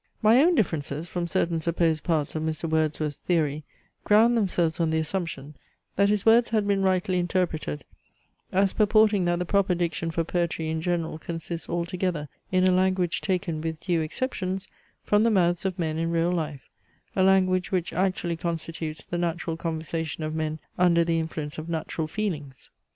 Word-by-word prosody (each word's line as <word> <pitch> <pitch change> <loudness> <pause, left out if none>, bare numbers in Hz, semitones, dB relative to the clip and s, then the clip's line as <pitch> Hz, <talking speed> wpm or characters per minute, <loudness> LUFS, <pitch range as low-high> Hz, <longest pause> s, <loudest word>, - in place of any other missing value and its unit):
My 225 +5 +6
own 345 +3 +4
differences 160 - -1
from 175 0 -3
certain 170 -2 0
supposed 165 -1 +1
parts 155 -4 0
of 155 - -2
Mr. 160 +1 -2
Wordsworth's 155 -2 0
theory 155 -4 0 0.4
ground 225 +3 +5
themselves 175 -7 +1
on 165 -1 +2
the 160 - +1
assumption, 160 -3 -3 0.4
that 200 +1 +3
his 210 -1 +1
words 230 +1 +5
had 215 -2 +1
been 200 -1 +2
rightly 185 -1 +1
interpreted, 175 - -1 0.7
as 195 +1 +2
purporting 215 -2 +4
that 175 0 +1
the 180 - -2
proper 195 0 +2
diction 170 -1 -1
for 165 0 -1
poetry 170 -1 -1
in 160 0 -2
general 165 -2 -2
consists 165 +1 -5
altogether 170 -3 -2 0.2
in 185 0 +4
a - - +4
language 185 -4 +1
taken, 180 -5 -1
with 160 -1 -3
due 175 -2 0
exceptions, 190 +1 -3 0.4
from 210 0 +3
the 230 - +4
mouths 175 -3 +2
of 190 -1 -1
men 160 -2 -1
in 165 0 0
real 170 +1 +1
life, 155 -6 -3 0.5
a 190 - +2
language 185 -1 +3
which 180 -3 -1
actually 185 -2 0
constitutes 160 -2 -4
the 175 - -3
natural 170 -1 -2
conversation 160 -1 -3
of 155 0 -3
men 155 0 -2 0.2
under 170 -2 +5
the 165 0 +1
influence 155 -2 -4
of 160 +2 -7
natural 160 -1 -3
feelings. 155 -9 -5
170 Hz, 175 wpm, -26 LUFS, 160-185 Hz, 0.7 s, My